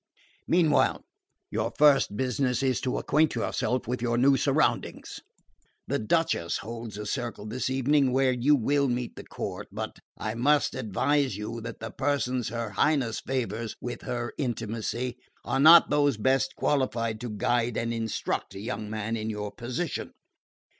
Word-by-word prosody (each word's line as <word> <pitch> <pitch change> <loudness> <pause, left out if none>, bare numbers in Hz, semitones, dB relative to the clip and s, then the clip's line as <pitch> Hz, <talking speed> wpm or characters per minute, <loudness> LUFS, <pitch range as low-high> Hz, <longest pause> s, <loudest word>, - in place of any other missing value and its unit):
Meanwhile 165 -4 +3 0.5
your - - -1
first 140 -8 +5
business 125 0 0
is 130 -1 +1
to 130 - -1
acquaint 155 +1 +2
yourself 125 -1 -1
with 125 0 -2
your 120 -1 0
new 135 +3 +5
surroundings. 130 - 0 0.7
The - - -1
Duchess 110 - +1
holds 115 0 -7
a 105 - -5
circle 115 -2 -4
this 120 +4 -2
evening, 135 +1 +2
where 130 0 +3
you 130 +4 +3
will 140 +3 +2
meet 125 -1 -2
the - - -8
court; - - -6
but - - -5 0.2
I 110 - -3
must 145 +6 +2
advise 130 +1 0
you 115 +2 -5
that 115 -1 -8
the 110 -1 -5
persons 130 -4 -1
her 115 -1 -4
Highness 135 -2 +1
favours 115 -4 -3
with 120 0 -5
her 120 -1 -4
intimacy 120 0 -3 0.3
are 135 - 0
not 160 +4 +8
those 145 -4 +3
best 130 +3 +1
qualified 115 -6 0
to 120 - -4
guide 115 +2 0
and 115 0 -1
instruct 115 -3 -3
a - - -6
young 105 0 -4
man 110 +1 -2
in 110 0 -3
your 105 -1 -4
position. 130 +7 -4
120 Hz, 155 wpm, -27 LUFS, 110-135 Hz, 0.7 s, not